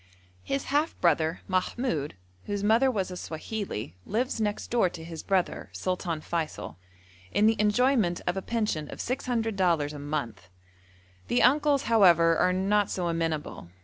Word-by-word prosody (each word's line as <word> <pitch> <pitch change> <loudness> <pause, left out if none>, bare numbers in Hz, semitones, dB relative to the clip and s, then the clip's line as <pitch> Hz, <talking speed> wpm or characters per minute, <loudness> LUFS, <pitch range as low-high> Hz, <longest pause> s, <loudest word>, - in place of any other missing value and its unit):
His 275 - -2
half 300 +3 +1
brother, 165 0 +2
Mahmoud, 185 - -1 0.3
whose 205 -1 -3
mother 230 +6 +4
was 195 -7 -2
a - - -5
Swahili, 165 - -5
lives 230 +2 -1
next 210 -1 -2
door 230 -6 +3
to 165 -1 -9
his 165 -1 -7
brother, 190 -2 -1
Sultan 180 -3 -2
Feysul, 155 - -4 0.5
in 210 - +3
the 225 +1 +5
enjoyment 210 -3 +2
of 175 - 0
a 190 - -2
pension 210 -10 -2
of - - -9
600 235 -3 -1
dollars 165 -6 +1
a 145 - -7
mouth. 130 -11 -4 0.8
The 245 - +2
uncles, 290 +1 +4
however, 170 -7 +5
are 180 - +3
not 195 +2 +1
so 175 -2 -2
amenable. 165 - -3
185 Hz, 150 wpm, -27 LUFS, 165-225 Hz, 0.8 s, the